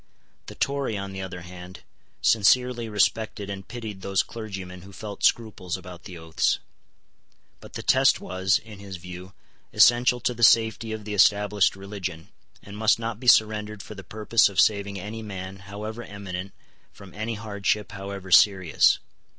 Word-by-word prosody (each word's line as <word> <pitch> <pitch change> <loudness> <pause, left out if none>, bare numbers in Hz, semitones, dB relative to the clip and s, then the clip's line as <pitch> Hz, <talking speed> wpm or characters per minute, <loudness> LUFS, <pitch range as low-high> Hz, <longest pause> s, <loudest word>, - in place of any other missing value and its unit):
The - - -9
Tory, 140 -6 -1
on 100 0 -6
the 95 - -5
other 90 -1 -7
hand, 90 +1 -11 0.4
sincerely 120 +2 +3
respected 105 -1 0
and 95 -1 -7
pitied 110 -5 -7
those 95 0 +1
clergymen 95 -5 -8
who 95 +2 -13
felt 100 +1 -8
scruples 105 -6 0
about 90 -1 -12
the 90 -3 -9
oaths. 80 -1 0 1.0
But - - -14
the - - -6
Test - - +4
was, 95 +1 +1
in 105 -2 -12
his 100 -2 -8
view, 90 +2 -10 0.4
essential 125 +1 +5
to 125 - 0
the 120 - -10
safety 110 -1 +4
of 110 -1 -6
the 105 - -4
established 105 0 +3
religion, 95 -3 -7 0.3
and 100 - -10
must 110 0 +3
not 115 -1 -4
be 125 - -8
surrendered 105 -2 +3
for - - -9
the 100 -2 -10
purpose 110 +4 +2
of 100 - -3
saving 100 -1 +2
any 105 +4 -6
man 95 -2 -7
however 105 +3 -6
eminent 100 -3 -7 0.4
from 100 -2 -14
any 110 +3 -4
hardship 105 -1 -2
however 100 -1 -7
serious. 95 -4 +5
100 Hz, 160 wpm, -25 LUFS, 95-110 Hz, 1.0 s, essential